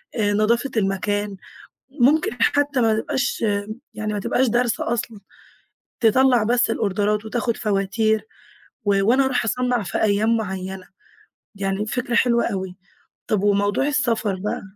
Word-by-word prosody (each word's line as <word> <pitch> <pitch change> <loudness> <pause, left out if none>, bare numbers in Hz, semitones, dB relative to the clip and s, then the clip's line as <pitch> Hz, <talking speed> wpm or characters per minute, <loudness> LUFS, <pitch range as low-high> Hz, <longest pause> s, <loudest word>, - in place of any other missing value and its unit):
آآ، 205 -3 +1
نضافة 235 +5 +1
المكان، 205 0 -1 0.5
ممكن 280 +3 +2
حتى 285 -1 +2
ما 220 -1 +2
تبقاش 260 +4 -2 0.5
يعني 215 -1 -3
ما 205 - -2
تبقاش 255 +6 +1
دارسة 240 0 0
أصلًا 230 -2 -4 0.8
تطلّع 245 +1 +4
بس 235 +1 +2
الأوردرات 210 0 0
وتاخد 235 +1 -2
فواتير 215 +1 0 0.6
و 200 -1 +3
وأنا 255 +6 +3
أروح 260 -2 0
أصنَّع 245 +1 0
في 175 - -3
أيام 220 +2 +2
معيّنة، 190 -3 -5 0.7
يعني 195 +1 -2
فكرة 245 +1 -2
حلوة 235 -1 +3
أوي، 190 -2 -4 0.5
طب 210 -3 0
وموضوع 205 +4 +2
السفر 230 -9 0
بقى؟ 200 +3 -4
220 Hz, 130 wpm, -22 LUFS, 205-245 Hz, 0.8 s, تطلّع